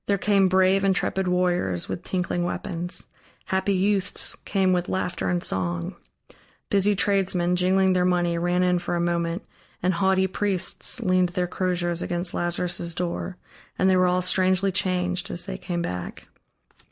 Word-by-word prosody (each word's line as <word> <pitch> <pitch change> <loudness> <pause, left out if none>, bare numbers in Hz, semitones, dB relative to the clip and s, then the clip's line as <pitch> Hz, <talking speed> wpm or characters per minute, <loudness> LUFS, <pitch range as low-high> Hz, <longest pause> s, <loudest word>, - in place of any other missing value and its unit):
There 200 - +2
came 195 -1 +3
brave, 190 +1 +3
intrepid 190 0 +1
warriors, 180 - 0
with - - -4
tinkling 180 -1 -2
weapons; 175 0 -3 0.4
happy 190 +1 0
youths 195 0 0
came 190 -2 +2
with 180 0 -1
laughter 185 -1 -2
and 175 -1 0
song; 85 -2 -2 0.8
busy 200 +1 +3
tradesmen, 190 -3 +1
jingling 190 +1 +3
their 180 -1 +2
money, 175 -1 +1
ran 175 +1 +1
in 180 -1 +2
for 175 - -3
a - - 0
moment, 170 +1 -1 0.4
and 185 +1 +2
haughty 190 +2 +2
priests 190 +4 0
leaned 185 -3 +2
their 180 0 -1
crosiers 175 -1 -1
against 175 0 -2
Lazarus' 175 -1 0
door, 180 +1 -3 0.4
and 190 +1 +3
they - - +4
were 185 0 +4
all 180 0 +1
strangely 185 +1 +2
changed, 180 -1 -1
as 170 - -3
they 195 -2 -5
came 175 -2 -3
back. 90 - -6
180 Hz, 155 wpm, -24 LUFS, 175-190 Hz, 0.8 s, they